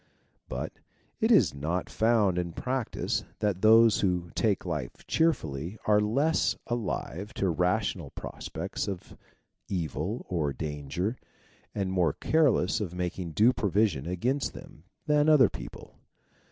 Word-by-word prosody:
But - - -4 0.5
it 220 +2 +2
is 210 - +5
not 80 +6 -2
found 105 -4 +2
in 85 -1 -3
practice 130 +2 -2
that 100 -3 -1
those 110 0 +6
who 90 -3 0
take 105 -5 0
life 75 -9 -5
cheerfully 85 - 0
are 105 -1 +4
less 135 +10 +2
alive 105 -4 -4
to 95 -3 +1
rational 90 +2 0
prospects - - -5
of 95 -3 -6 0.5
evil 85 - -3
or 75 -6 -1
danger 75 - -3 0.6
and 95 -2 -1
more 90 -6 +2
careless 145 - +2
of 90 -4 -4
making 90 -1 -3
due 115 +10 +5
provision 100 - +1
against 120 +9 -1
them, 80 - -12 0.2
than 150 0 +3
other 140 -7 +6
people. - - -10
95 Hz, 125 wpm, -28 LUFS, 85-115 Hz, 0.6 s, those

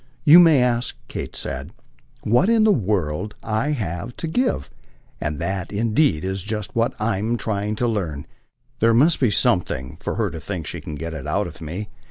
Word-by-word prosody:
"You 165 +2 +9
may 160 -7 +6
ask," 120 -1 0
Kate - - -6
said, - - -4 0.5
"what 125 - +3
in 230 -1 +4
the 215 - +5
world 105 - -1
I 110 +7 0
have 100 - -4
to 165 - -3
give; 205 - 0 0.5
and 75 0 -3
that 95 +3 -3
indeed 110 - +2
is 95 +1 -2
just 105 +1 -4
what 115 0 0
I'm 110 +2 0
trying 105 -1 -2
to 120 +3 0
learn. 85 -10 -2 0.5
There 115 0 +4
must 155 +8 +4
be 125 - +3
something, 90 - 0
for - - -3
her - - 0
to 80 - -6
think 85 -1 -5
she - - -5
can 75 - -6
get 80 +2 -5
it 75 -5 -6
out - - 0
of - - -9
me. 85 +7 -5
105 Hz, 190 wpm, -22 LUFS, 85-120 Hz, 0.5 s, You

